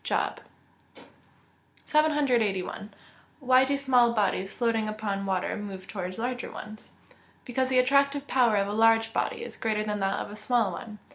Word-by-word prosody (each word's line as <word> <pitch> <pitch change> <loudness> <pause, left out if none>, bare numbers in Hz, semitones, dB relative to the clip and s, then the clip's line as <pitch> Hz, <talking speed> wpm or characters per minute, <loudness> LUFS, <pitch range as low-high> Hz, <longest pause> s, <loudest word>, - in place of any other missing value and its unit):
JOB - - -1 0.6
XXVI.] - - -15 0.8
781. 245 -10 +1 0.5
Why 255 -2 +4
do 280 +1 0
small 250 -4 +3
bodies 195 -3 0
floating 225 -3 0
upon 205 -2 -3
water 185 -1 -1
move 195 -2 -7
towards 185 -3 -5
larger 245 +2 -3
ones? 215 0 -9 0.5
Because 255 +1 -1
the 260 - +2
attractive 280 +2 +3
power 245 -6 +3
of 200 -1 +1
a 205 - -3
large 225 +1 +3
body 465 -1 -2
is - - -8
greater 215 -1 -1
than 210 -1 -3
that 195 0 0
of - - -5
a - - -8
small 215 -1 +1
one. 210 +4 -8
225 Hz, 160 wpm, -27 LUFS, 205-255 Hz, 0.8 s, Why